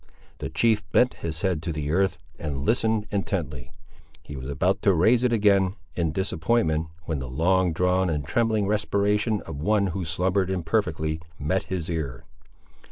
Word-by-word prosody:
The - - -4
chief 110 -3 +2
bent 125 +1 +4
his 80 -1 -3
head 90 -5 +1
to 85 - -3
the 75 -2 -3
earth, 95 0 +2 0.2
and 70 -3 -3
listened 110 -1 +1
intently. 80 -11 -3 0.5
He 70 - -8
was 65 +1 -6
about 90 +8 +1
to 100 -3 +4
raise 115 +9 +4
it 125 - +3
again, 100 -4 +3 0.2
in 85 -3 0
disappointment, 80 -2 0 0.2
when 80 -3 -3
the 65 -1 -5
long 90 +6 +2
drawn 90 +2 +1
and 75 -3 -2
trembling 110 - +1
respiration 105 +1 +1
of 80 -3 -7
one 105 +3 +2
who 95 -1 -3
slumbered 90 +3 0
imperfectly 80 -3 -1 0.2
met 80 +7 -1
his 90 -3 -3
ear. 80 -7 -4
90 Hz, 165 wpm, -25 LUFS, 80-100 Hz, 0.5 s, bent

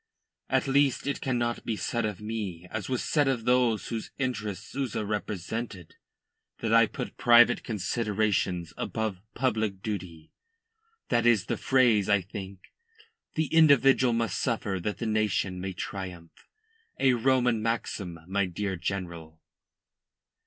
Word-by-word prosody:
At - - +1
least 140 0 +2
it 140 -1 -2
cannot 120 -2 -1
be 115 - -2
said 115 +2 -1
of 105 -4 -3
me, 105 -5 -5
as 110 +1 -4
was 130 -2 -1
said 145 -3 +2
of 120 -4 0
those 125 -3 +2
whose 115 -2 -4
interests 110 -7 -3
Souza 130 -6 -2
represented, 105 -2 -4 0.6
that 115 -1 -1
I 115 -1 +6
put - - -6
private 120 0 +6
considerations 105 -5 -1
above 110 -5 -3
public 110 -6 -1
duty 90 -7 -5 0.8
that 120 0 +2
is 110 -6 +4
the - - -1
phrase, 120 -7 +3
I 100 -1 +5
think. 95 0 -8 0.7
The 160 - +1
individual 135 -5 +5
must 115 -4 -1
suffer 105 -6 -1
that 105 +4 -3
the 115 - -4
nation 105 -4 0
may 95 0 -4
triumph. 90 -3 -7 0.5
A 130 -1 +4
Roman 125 -2 +2
maxim, 105 -6 -3
my 95 +1 0
dear 95 +1 -3
General." 85 -3 -5
110 Hz, 135 wpm, -28 LUFS, 95-120 Hz, 0.8 s, I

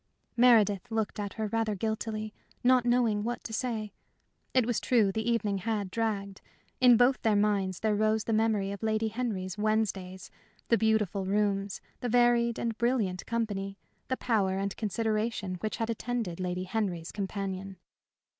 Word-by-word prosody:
Meredith 225 -4 +4
looked 220 -1 -2
at 205 -1 -3
her 220 - -3
rather 220 0 0
guiltily, 215 +1 -3 0.3
not 250 0 +4
knowing 235 -4 +2
what 240 +2 -3
to 225 - -7
say. 220 -3 -2 0.6
It 255 -3 +3
was 240 -2 0
true 220 -6 +3
the 220 +3 -2
evening 210 -4 0
had 205 -1 -2
dragged. 200 -3 -2 0.4
In 245 -2 +7
both 245 +2 +4
their 220 -3 +3
minds 200 -3 +1
there 220 -1 +2
rose 215 +1 +2
the 225 - -1
memory 215 -3 +1
of 200 - -6
Lady 220 0 0
Henry's 210 -5 -3
"Wednesdays," 200 -4 -1 0.4
the 230 - +5
beautiful 210 -3 +1
rooms, 200 -1 0 0.2
the 245 - -3
varied 240 -1 +3
and 230 -1 -2
brilliant 225 -7 0
company, 200 -4 -2 0.3
the 260 - -1
power 195 -6 +1
and 195 0 -2
consideration 215 -3 -1
which 215 +2 -3
had 225 0 -1
attended 230 -6 -3
Lady 180 0 -2
Henry's 185 -4 -2
companion. 195 -1 -4
215 Hz, 155 wpm, -29 LUFS, 195-230 Hz, 0.6 s, In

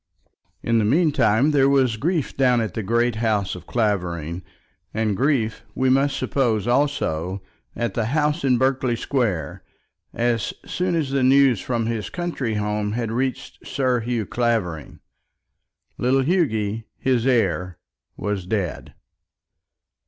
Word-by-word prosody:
In 115 -1 +2
the - - +2
meantime 135 -1 +3
there 135 -2 +4
was 130 -4 +3
grief 155 - -1
down 125 -3 +3
at 110 -5 -2
the 110 - -3
great 120 +2 +1
house 110 -4 0
of 90 -1 -10
Clavering; 90 -7 -1 0.5
and 110 -2 0
grief, 125 -3 0
we 130 0 +2
must 135 +1 +2
suppose 115 -7 0
also, 100 - 0 0.3
at 115 -4 -2
the 115 - -1
house 150 +4 0
in 130 -3 +3
Berkeley 130 -1 +1
Square, 110 - -2 0.5
as 120 -2 -1
soon 180 -1 -1
as 150 -5 -1
the 135 -1 +1
news 130 -4 +4
from 120 -3 -1
his 115 -2 -3
country 165 -10 -3
home 105 0 -1
had 115 -1 -2
reached 130 +2 -3
Sir 130 -2 +1
Hugh 115 -1 -2
Clavering. 110 -10 -2 1.0
Little 130 +2 +2
Hughy, 115 - 0
his 125 -1 +1
heir, 90 - +1 0.4
was 100 -3 -3
dead. 95 -5 -3
120 Hz, 135 wpm, -22 LUFS, 105-135 Hz, 1.0 s, there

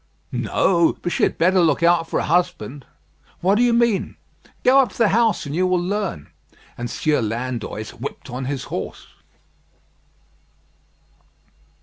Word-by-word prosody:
"No; 170 -3 +2
but 175 - -1
she - - -1
had - - +2
better 185 +3 +3
look 165 -1 +2
out 170 -1 +3
for - - 0
a - - -1
husband." 170 -5 -1 0.5
"What 190 +3 +3
do 215 - +2
you 245 -1 +4
mean?" 235 -3 +1 0.5
"Go 265 +2 +6
up 255 -7 +3
to - - -13
the 230 -3 +4
house, 225 -1 +2
and 140 - -5
you 185 +2 +2
will 185 0 +2
learn." 185 - -3 0.4
And 120 0 -5
Sieur 150 +1 0
Landoys 115 -1 -4
whipped 135 +5 -8
on 130 +1 -5
his 135 -1 -3
horse. - - -5
175 Hz, 150 wpm, -21 LUFS, 135-200 Hz, 0.5 s, Go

